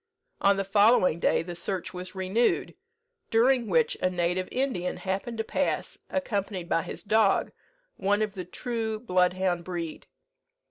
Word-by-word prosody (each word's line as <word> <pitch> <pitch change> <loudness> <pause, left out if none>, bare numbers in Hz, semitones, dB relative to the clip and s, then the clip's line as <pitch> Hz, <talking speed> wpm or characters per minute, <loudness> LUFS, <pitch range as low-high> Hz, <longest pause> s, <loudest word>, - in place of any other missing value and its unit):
On 200 0 +4
the 195 - 0
following 200 -3 +4
day - - +2
the 175 +1 -6
search 185 +2 -3
was 185 +2 -7
renewed, 190 +6 +1 0.6
during 240 +1 +3
which 475 - +2
a 185 - +3
native 180 +1 -1
Indian 250 -9 -1
happened 195 +4 -3
to 220 - 0
pass, - - -2
accompanied 200 -9 -2
by 165 - +2
his - - -7
dog, 215 -1 +3 0.5
one 205 +2 +2
of 210 -2 -3
the 185 -2 -5
true 220 +3 -3
bloodhound 180 -3 +1
breed. 170 -3 -5
195 Hz, 145 wpm, -27 LUFS, 180-225 Hz, 0.6 s, On